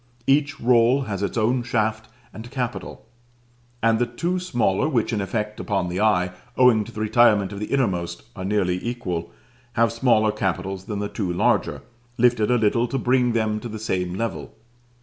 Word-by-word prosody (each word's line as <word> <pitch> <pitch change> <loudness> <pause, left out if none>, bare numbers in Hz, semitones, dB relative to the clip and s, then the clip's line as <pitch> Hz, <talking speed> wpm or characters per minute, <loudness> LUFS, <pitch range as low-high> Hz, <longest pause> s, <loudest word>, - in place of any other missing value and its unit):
Each 145 +2 +2
roll 120 +2 +4
has 105 -7 -4
its 100 - -2
own 120 +3 +2
shaft 110 -1 -1 0.2
and 110 +2 -9
capital; 125 -2 -5 0.8
and 115 -1 +3
the 120 - +1
two 175 +10 -2
smaller, 125 - 0
which 120 -4 0
in 105 - 0
effect 105 +1 -3
upon 95 -4 -1
the 90 +3 -2
eye, 90 -4 +2 0.3
owing 125 -4 +5
to 115 - -10
the 110 -1 -6
retirement 105 -3 +3
of 100 - -6
the 105 - -4
innermost, 90 -10 -1
are 95 - -6
nearly 95 -2 0
equal, 90 -9 -4 0.4
have 115 -1 +2
smaller 115 -3 +3
capitals 95 -2 -3
than 105 - -4
the 105 0 -2
two 100 -4 -3
larger, 90 - +1 0.3
lifted 120 -2 +3
a 125 - +4
little 115 +2 +2
to 135 - -2
bring 125 -1 +2
them 110 -2 0
to 120 - -7
the 110 - -6
same 90 -4 -2
level. 115 +3 -4
110 Hz, 180 wpm, -23 LUFS, 100-120 Hz, 0.8 s, owing